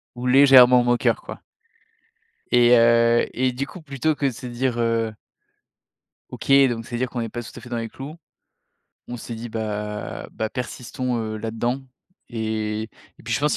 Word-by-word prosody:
ou 120 - -6
légèrement 125 -1 +7
moqueur 120 0 +1
quoi - - -9 1.1
et 120 0 +6
heu 115 0 +4
et 130 +1 +1
du 135 +3 -3
coup 175 - -11
plutôt 150 +1 -1
que 145 - -2
de 135 - 0
se 120 - -10
dire: 120 0 -2
«heu 115 -2 0 1.1
OK, - - -5 0.2
donc, 115 -1 -4
c'est-à-dire 120 +1 -3
qu'on 120 - -4
est 115 - -3
pas 120 +2 -6
tout 120 - -10
à - - -8
fait 120 - -12
dans 120 - -3
les 115 -1 -4
clous». 140 +7 -9 0.9
On 120 - -5
s'est 115 0 -7
dit: 115 +2 -7
«bah 105 -1 -5
bah, 110 - -2
persistons, 125 0 -4
heu, 110 -1 -3
là-dedans» 115 +4 -2 0.5
et 110 -1 -2 0.3
et - - -16
puis - - -4
je - - -1
pense, 150 0 +1
120 Hz, 175 wpm, -23 LUFS, 115-125 Hz, 1.1 s, légèrement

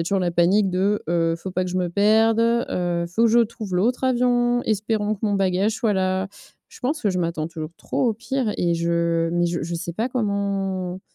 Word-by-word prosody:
a - - -1
toujours 195 +3 0
la 175 -1 0
panique 185 +4 +3
de, 195 +3 0
heu, 165 -1 +1
faut 190 +3 -7
pas 185 - 0
que 180 - -4
je 185 - -3
me 180 -1 0
perde. 220 +4 +3
Heu, 180 -7 0
faut 220 +7 0
que - - +5
je 235 - +5
trouve 220 -4 -3
l'autre 245 +8 +1
avion, 245 -1 +2
espérons 215 0 0
que 200 - -15
mon 205 - +1
bagage 195 +2 +1
soit 220 -3 0
là. 190 0 0 0.4
Je - - -15
pense 290 +3 -2
que 205 - +2
je 180 - -2
m'attends 165 -2 -2
toujours 160 -1 -6
trop - - -2
au 225 - +2
pire. 230 0 -2
Et 170 -1 +1
je 170 0 0
mais 175 0 +1
je 170 -1 -2
je 170 +1 -4
sais 170 +1 -4
pas 225 +8 -2
comment 195 -5 -2
195 Hz, 225 wpm, -23 LUFS, 175-225 Hz, 0.4 s, que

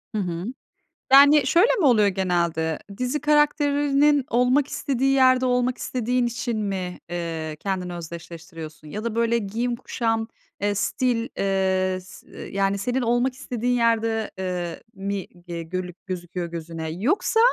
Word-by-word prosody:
Hı - - +1
hı. 175 -1 -3 0.7
Yani 285 0 +8
şöyle 350 - +5
mi 340 - +3
oluyor 220 -6 +5
genelde? 170 -4 0 0.2
Dizi 255 +4 -1
karakterinin 290 -1 +3
olmak 250 +4 +3
istediği 270 -2 0
yerde 260 -1 +5
olmak 250 0 +1
istediğin 250 0 -1
için 235 -1 -3
mi, 190 -3 -3
ııı, 165 -3 -3
kendini 185 -1 -3
özdeşleştiriyorsun? 165 -2 -9
Ya 210 +8 -5
da 230 -1 -3
böyle 235 0 +2
giyim, 230 +3 -2
kuşam, 225 -2 -1 0.3
eee, 205 0 +1
stil, 235 +3 0
eee, 190 -1 +1
s 185 - -15
eee, - - -10
yani 195 0 +2
senin 245 +6 -1
olmak 240 +2 +1
istediğin 245 -2 -2
yerde, 225 -2 +1
eee, 180 -2 -4
mi 195 -1 -4 0.2
ge 170 -1 -4
gölük 180 +1 -6
gözüküyor 180 -1 -4
gözüne? 165 -1 -6
Yoksa, 260 - +1
215 Hz, 140 wpm, -24 LUFS, 180-250 Hz, 0.7 s, Yani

